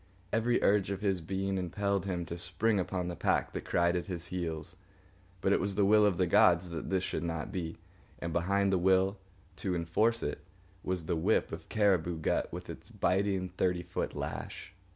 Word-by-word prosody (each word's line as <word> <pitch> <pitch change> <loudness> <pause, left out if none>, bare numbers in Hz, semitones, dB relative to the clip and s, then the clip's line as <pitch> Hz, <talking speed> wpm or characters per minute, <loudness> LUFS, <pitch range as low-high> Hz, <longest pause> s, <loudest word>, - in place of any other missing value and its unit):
Every 120 +2 +2
urge 100 -1 +3
of 100 -1 -3
his 95 -4 +1
being 95 +2 -2
impelled 100 +2 -1
him 90 -2 -2
to 85 +1 -6
spring 110 +3 +1
upon 90 -1 -2
the 90 - -4
pack - - +1
that - - -5
cried 85 0 +2
at 90 - -2
his 85 -3 -4
heels, 85 -1 -4 0.6
but 95 - +3
it - - +3
was 100 +1 -2
the 100 0 +3
will 105 +1 +6
of 95 -4 +1
the 95 - +3
gods 85 +1 +4
that 85 - -5
this 95 -1 +1
should 80 - -2
not 85 -2 -3
be; 85 -4 -4 0.4
and 85 -1 -4
behind 100 +3 +2
the 95 - +3
will, 95 +2 +3 0.4
to 95 -2 -1
enforce 110 +8 +1
it, - - -3 0.4
was 90 -3 -2
the 85 - 0
whip 90 +7 +1
of - - -8
cariboo 95 -5 +2
gut 80 - 0
with - - -7
its - - -9
biting 95 -1 0
thirty 90 -1 0
foot - - -3
lash. - - -5
95 Hz, 195 wpm, -31 LUFS, 85-100 Hz, 0.6 s, will